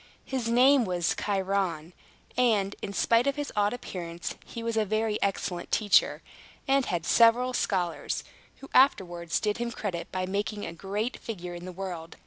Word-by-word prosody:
His 255 -4 -2
name 255 +3 +5
was 175 -4 0
Chiron; 190 -5 -1 0.4
and, 210 -6 +2
in 200 - -4
spite 230 +5 +3
of 280 - +1
his 290 -1 -4
odd 205 0 +2
appearance, 175 -8 -5
he 230 - -8
was 230 0 -2
a 220 - +3
very 215 +1 -1
excellent 185 -3 -2
teacher, 210 -2 +3 0.4
and 270 -1 +3
had 175 -2 -2
several 240 +4 +5
scholars, 180 -8 -1 0.4
who 275 - -10
afterwards 175 -10 +3
did 210 +1 -1
him 240 0 -1
credit 185 -7 -4
by 185 0 -1
making 205 +2 -2
a 165 - -6
great 205 +7 -3
figure 180 -6 -6
in 175 0 -8
the 185 - -6
world. 175 -3 -6
205 Hz, 165 wpm, -28 LUFS, 180-230 Hz, 0.4 s, name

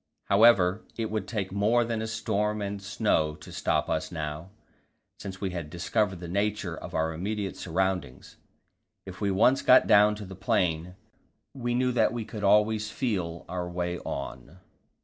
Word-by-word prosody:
However, 100 -2 +5
it 110 -2 -2
would 110 0 -2
take 100 -5 -3
more 110 +5 +2
than 115 -1 -2
storm 105 -1 -1
and 100 -1 -4
snow 95 -6 0
to - - -13
stop - - 0
us - - -2
now, 80 +1 -5 0.7
since 95 -2 -7
we 95 -2 -2
had 85 -4 -5
discovered 95 +3 -1
the 85 - -7
nature 100 -1 -1
of - - -8
our 80 0 0
immediate 100 +3 -3
surroundings; 90 -6 -3 0.7
if 95 +1 -10
we 100 - +1
once 110 +8 +4
got 130 - +6
down 105 0 +5
to 105 -1 -8
the 95 - -9
plain, 90 -4 0 0.6
we 120 -3 -2
knew 125 0 +2
that 115 -2 +2
we 115 -2 -4
could 105 -1 -7
always 105 +1 +3
feel 90 -11 -3
our 90 -1 -4
way 90 0 -3
on. 70 +5 -6
100 Hz, 165 wpm, -28 LUFS, 90-110 Hz, 0.7 s, got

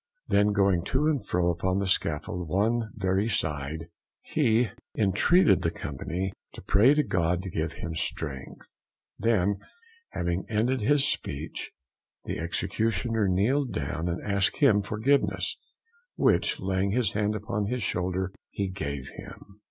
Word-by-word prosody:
Then 105 +1 +4
going 100 -4 +2
to 140 +3 +1
and 150 -7 +1
fro 90 -2 +1
upon 90 +2 -1
the 100 - 0
scaffold 90 -1 -1
one 110 +6 +1
very 95 +2 +1
side, 80 -4 -2 0.4
he 120 -7 +2 0.2
intreated 115 - +4
the - - +1
company 95 +2 -4 0.2
to - - -10
pray 120 +9 +5
to 150 - +3
God 90 - 0
to 95 - -6
give 80 0 -2
him 85 - -5
strength. 75 -4 -4 0.5
Then 100 -3 +2 0.5
having 85 +1 -2
ended 115 +4 +1
his 145 +5 +3
speech, 70 +3 -3 0.5
the - - -3
Executioner 110 +6 0
kneeled 120 +9 +1
down 80 +5 -2
and 85 - -2
asked 100 -1 +1
him 115 -9 +5
forgiveness, 110 +8 +1 0.6
which - - +2
laying 95 +1 0
his 120 -5 +2
hand 105 +1 0
upon 105 -1 -2
his 125 0 -2
shoulder 95 +1 -1 0.2
he 100 -1 -2
gave 70 -7 -4
him. 100 +1 -12
100 Hz, 140 wpm, -27 LUFS, 90-110 Hz, 0.6 s, pray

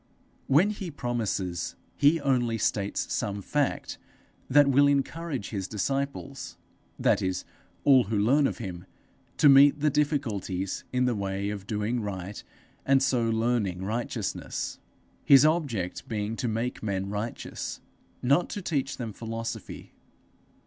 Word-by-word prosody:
When 170 +10 +4
he 195 -4 -5
promises, 105 - -2 0.2
he 150 +4 +4
only 125 -4 +1
states 100 -2 -1
some 100 0 -2
fact 145 +8 -1 0.5
that 145 +2 +6
will 140 +1 +5
encourage 140 -2 -1
his 95 -3 -3
disciples 135 +4 -3 0.4
that - - +2
is, 95 -1 -2 0.4
all 130 -4 +6
who 105 +2 -1
learn 135 +8 +4
of - - -4
him 90 -6 -7 0.5
to - - +6
meet 140 +1 +7
the 150 0 +2
difficulties 110 - -1
in 125 0 +2
the 125 - +2
way 100 -1 -2
of 100 -1 -7
doing 110 +2 -1
right 100 -1 -5 0.4
and 135 0 +3
so 120 -4 +2
learning 110 -5 0
righteousness, 115 +4 -3 0.4
his 140 0 +7
object 140 - 0
being 105 0 -2
to 125 - -1
make 115 +3 -2
men 95 -3 -2
righteous, 105 +3 -5 0.4
not 140 +8 +3
to 205 - -4
teach 140 -5 -1
them 115 -4 -5
philosophy. 115 +1 -6
120 Hz, 135 wpm, -27 LUFS, 105-140 Hz, 0.5 s, meet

